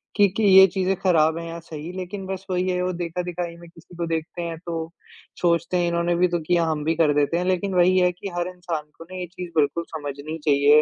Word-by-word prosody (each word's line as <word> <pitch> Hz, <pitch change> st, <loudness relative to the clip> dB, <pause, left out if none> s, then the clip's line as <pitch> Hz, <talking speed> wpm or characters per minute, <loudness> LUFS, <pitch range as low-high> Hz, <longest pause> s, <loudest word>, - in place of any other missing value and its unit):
कि 205 Hz, -1 st, +6 dB
कि 220 Hz, -, +1 dB
ये 190 Hz, -1 st, +9 dB
चीज़ें 190 Hz, +1 st, 0 dB
खराब 160 Hz, -3 st, +3 dB
हैं 170 Hz, 0 st, -5 dB
या 165 Hz, 0 st, -6 dB
सही, 160 Hz, 0 st, -8 dB
लेकिन 190 Hz, +2 st, -5 dB
बस 190 Hz, 0 st, -5 dB
वही 180 Hz, 0 st, 0 dB
है, 180 Hz, 0 st, 0 dB
वो 185 Hz, -, 0 dB
देखा-दिखाई 175 Hz, 0 st, -4 dB
में 170 Hz, 0 st, -13 dB
किसी 170 Hz, +1 st, -17 dB
को 170 Hz, 0 st, -2 dB
देखते 165 Hz, +1 st, -3 dB
हैं, 170 Hz, -1 st, -4 dB
तो 165 Hz, -1 st, -4 dB, 0.5 s
सोचते 170 Hz, 0 st, +2 dB
हैं 175 Hz, -1 st, +1 dB
इन्होंने 170 Hz, 0 st, +1 dB
भी 180 Hz, +1 st, +3 dB
तो 175 Hz, -1 st, -1 dB
किया, 175 Hz, -1 st, +3 dB
हम 155 Hz, -2 st, -1 dB
भी 160 Hz, +2 st, +1 dB
कर 155 Hz, -2 st, +3 dB
देते 145 Hz, +3 st, +1 dB
हैं। 180 Hz, -, -1 dB
लेकिन 185 Hz, +1 st, 0 dB
वही 180 Hz, +1 st, +4 dB
है 180 Hz, 0 st, +4 dB
कि 180 Hz, +3 st, -7 dB
हर 175 Hz, 0 st, 0 dB
इंसान 175 Hz, -4 st, -4 dB
को -, -, -10 dB
ना 185 Hz, -, -6 dB
ये 180 Hz, -, -3 dB
चीज़ 180 Hz, 0 st, -8 dB
बिल्कुल 155 Hz, +3 st, +2 dB
समझनी 145 Hz, +1 st, -5 dB
चाहिए 145 Hz, 0 st, +6 dB
170 Hz, 245 wpm, -23 LUFS, 165-180 Hz, 0.5 s, ये